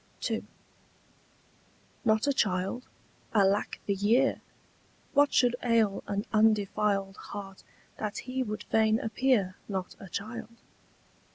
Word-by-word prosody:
II. - - -1 1.6
Not 220 -1 +3
a 285 - +2
child? 195 +1 0 0.5
alack 200 0 +2
the 200 - +1
year! 225 +7 +2 0.7
What 290 0 +5
should 245 -1 +4
ail 225 -4 +2
an 200 +1 -2
undefiled 210 -2 +2
Heart, 195 -2 -8 0.4
that 215 -1 -3
he 260 +1 -3
would 215 -4 -3
fain 220 0 +3
appear 220 -5 +1
Not 190 -2 -3
a 195 - -10
child? 230 +4 -6
215 Hz, 110 wpm, -29 LUFS, 200-235 Hz, 1.6 s, What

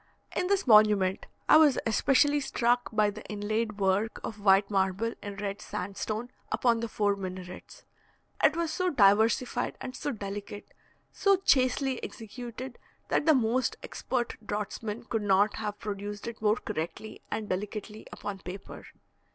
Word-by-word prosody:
In 360 - 0
this 395 0 +1
monument 210 -5 +5 0.2
I - - +8
was 305 -4 +5
especially 285 +5 +3
struck 245 -3 +1
by 215 -2 +2
the 210 - -10
inlaid 210 +1 -2
work 200 +3 +1
of 210 - -6
white 195 0 +5
marble 195 +4 +1
in 205 -1 -6
red 200 0 -4
sandstone 215 +5 -4 0.2
upon 235 -2 +2
the 230 - -2
four 205 -2 +1
minarets, 185 -2 -8 0.6
it 310 - +5
was 335 -2 -1
so 365 0 +1
diversified 220 - +3
and 255 0 -6
so 290 - -3
delicate; 205 -2 -7 0.4
so 395 -1 +3
chastely 265 -6 +2
executed 240 +3 -7 0.3
that - - +1
the 315 - +7
most 245 +1 +1
expert 240 -2 -3
draughtsman 210 +1 -4
could 225 -1 -2
not 205 +1 +3
have 210 -1 -4
produced 205 0 -5
it 235 -2 -7
more 210 0 +3
correctly 215 -1 -5
and 215 - -3
delicately 210 +3 -5
upon 200 -2 -6
paper. 190 +1 -9
215 Hz, 145 wpm, -29 LUFS, 200-245 Hz, 0.6 s, I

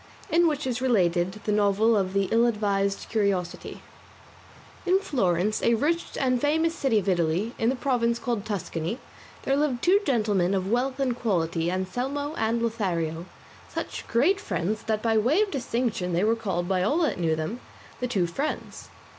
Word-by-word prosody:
IN 340 +1 +4
WHICH 300 -2 -1
IS 255 -1 -2
RELATED 185 -7 +2
THE 210 - -1
NOVEL 210 +2 +3
OF 190 -2 0
"THE 200 0 +2
ILL 230 +1 +4
ADVISED 200 -3 0
CURIOSITY" 200 -5 -2 1.0
In 370 +1 +3
Florence, 215 - 0
a 235 - +3
rich 325 +8 -1
and 255 -2 +1
famous 320 +3 +2
city 270 -9 +1
of 200 - -1
Italy 180 +5 +1
in 225 - +2
the 260 - 0
province 240 -3 +1
called 235 -3 -2
Tuscany, 185 -1 -3 0.5
there 270 - +1
lived 280 -4 0
two 380 +3 +5
gentlemen 210 - +1
of 190 +1 -2
wealth 255 +3 0
and 260 -3 +1
quality, 170 -7 0
Anselmo 255 +11 -2
and 230 -5 0
Lothario, 175 -7 -2 0.4
such - - -5
great 345 +12 +2
friends 210 - -2
that 215 -1 0
by 225 -1 +3
way 260 - +2
of 410 - -4
distinction 235 - -2
they 175 +3 +1
were 225 +2 +3
called 190 -6 -2
by 185 -1 +1
all 215 - +1
that 300 - 0
knew 160 -2 +1
them 160 +10 -4 0.4
"The 250 - -1
Two 195 -8 +1
Friends." 275 - -4
225 Hz, 170 wpm, -26 LUFS, 185-255 Hz, 1.0 s, two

